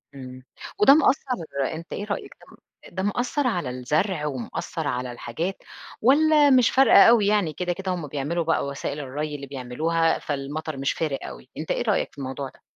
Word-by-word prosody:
امم 130 -1 -10 0.4
وده 210 +7 +8
مأثر 275 - +2 0.3
أنت 165 +2 -8
إيه 205 - -4
رأيك 205 -1 -5
ده - - -18
م - - -15 0.4
ده 190 - -2
مأثر 250 +6 0
على 175 - -1
الزرع 150 +7 -1
ومأثر 145 +3 -4
على 125 -2 -2
الحاجات 160 +10 -5 0.4
والّا 295 +3 +5
مش 255 -3 +5
فارقة 265 -6 +7
أوي 220 -4 +4
يعني 205 -7 +2
كده، 180 -1 -2
كده 190 +1 -4
هم 170 -4 -5
بيعملوا 150 +5 -2
بقى 165 -3 +1
وسائل 140 +1 -4
الري 145 +2 -4
اللي 140 -1 -7
بيعملوها 155 +6 0
فالمطر 145 +1 -4
مش 135 0 0
فارق 150 -4 -2
أوي 130 - -11
أنت 155 - -4
إيه - - 0
رأيك 215 -4 0
في - - -25
الموضوع 135 0 -5
ده؟ - - -24
160 Hz, 185 wpm, -24 LUFS, 140-205 Hz, 0.4 s, وده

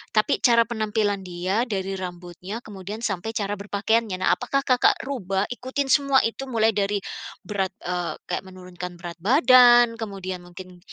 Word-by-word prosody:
tapi 215 +6 +2
cara 235 -2 +5
penampilan 215 -3 -1
dia, 185 +7 -1
dari 195 -3 -3
rambutnya, 180 +4 -7
kemudian 205 +2 -8
sampai 195 0 -2
cara 205 -1 -1
berpakaiannya. 210 0 0
Nah, - - +4
apakah 275 +2 -1
Kakak 250 -1 +4
rubah 195 -8 -2
ikutin 260 +2 -3
semua 275 -2 +4
itu? 265 +4 -3
Mulai 225 -2 +2
dari 205 0 0 0.5
berat 195 -2 -2
eee, 180 -1 -2
kayak 180 - -3
menurunkan 180 -1 -9
berat 170 -1 -8
badan, 240 - +6
kemudian 190 -4 -5
mungkin 180 0 -12
205 Hz, 150 wpm, -24 LUFS, 185-235 Hz, 0.5 s, badan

